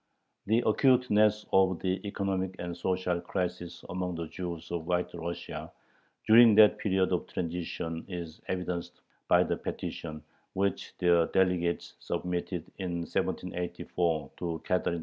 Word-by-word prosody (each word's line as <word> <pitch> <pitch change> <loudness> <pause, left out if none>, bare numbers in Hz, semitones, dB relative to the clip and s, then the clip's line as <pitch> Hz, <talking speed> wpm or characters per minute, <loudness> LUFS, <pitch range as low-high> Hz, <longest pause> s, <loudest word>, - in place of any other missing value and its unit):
The 115 +3 +3
acuteness 110 -3 +4
of 95 -2 +4
the 95 0 -1
economic 95 -2 -2
and 85 0 -5
social 90 0 -1
crisis 90 -1 -4
among 90 -1 -3
the 85 0 -3
Jews 85 -3 -6
of 85 -2 -3
White 90 0 0
Russia 85 0 -5 0.5
during 115 0 +8
that 105 -1 +7
period 95 -2 +1
of 90 - -1
transition 85 -1 -4
is 85 -3 -7
evidenced 90 -1 -3 0.3
by - - +5
the - - -1
petition 75 -2 -5 0.3
which 100 0 -1
their 85 -2 +4
delegates 90 -2 +1
submitted 90 0 -3
in 90 -2 -2
1784 85 -2 -2
to 85 -2 -3
Catherine 90 -1 +1
II. - - -3
90 Hz, 130 wpm, -30 LUFS, 85-95 Hz, 0.5 s, during